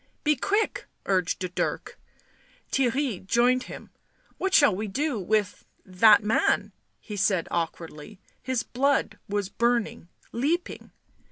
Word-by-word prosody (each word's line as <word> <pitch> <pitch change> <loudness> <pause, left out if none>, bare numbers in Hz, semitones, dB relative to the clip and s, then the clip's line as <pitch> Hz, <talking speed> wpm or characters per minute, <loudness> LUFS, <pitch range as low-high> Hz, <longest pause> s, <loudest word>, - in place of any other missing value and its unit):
" - - -44
Be 300 0 +3
quick 410 - -1
!" - - -46
urged 180 0 -1
Dirk. - - -3 0.7
Theirry 260 -5 0
joined 245 +5 +2
him. - - -10 0.2
" - - -36
What 385 - -1
shall 285 -10 +6
we 210 +3 -3
do 270 +4 -1
with— 205 +1 -1 0.2
that 205 +3 +5
man 215 +2 +1
?" - - -47
he 210 - -4
said 195 -3 +1
awkwardly; 165 +2 -5 0.2
his 255 -2 -1
blood 275 +4 0
was 205 -1 -1
burning, 235 -5 -1 0.2
leaping. 310 +9 -2
220 Hz, 140 wpm, -26 LUFS, 190-265 Hz, 0.7 s, shall